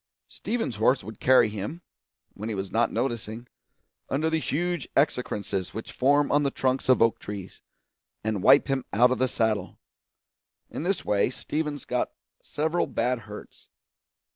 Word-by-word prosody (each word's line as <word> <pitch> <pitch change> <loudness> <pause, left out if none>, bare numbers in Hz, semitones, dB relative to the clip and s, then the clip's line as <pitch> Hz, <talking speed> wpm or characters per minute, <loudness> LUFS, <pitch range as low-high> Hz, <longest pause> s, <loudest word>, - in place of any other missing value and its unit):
Stevens's 225 - -3
horse 125 +4 +3
would 110 - -9
carry 130 -3 +5
him, 105 - -6 0.5
when 105 +3 -6
he 110 - -2
was 95 0 -4
not 115 - +2
noticing, 115 -1 -3 0.6
under 155 +4 0
the 160 - +2
huge 175 +1 -2
excrescences 105 - 0
which 110 - -6
form 145 +2 +3
on 145 - +4
the 140 - +1
trunks 130 -1 -1
of 130 -3 +6
oak 115 - +2
trees, 100 -2 -8 0.6
and 110 -3 -1
wipe - - +6
him 135 -2 0
out 125 +4 +5
of 130 - 0
the 130 - +3
saddle; 110 -5 -1 0.9
in - - -4
this 185 +4 -1
way 100 +2 +2
Stevens 150 +2 -4
got 125 0 -1 0.3
several 160 +3 -1
bad 125 0 0
hurts. 105 -1 -12
125 Hz, 155 wpm, -26 LUFS, 110-145 Hz, 0.9 s, of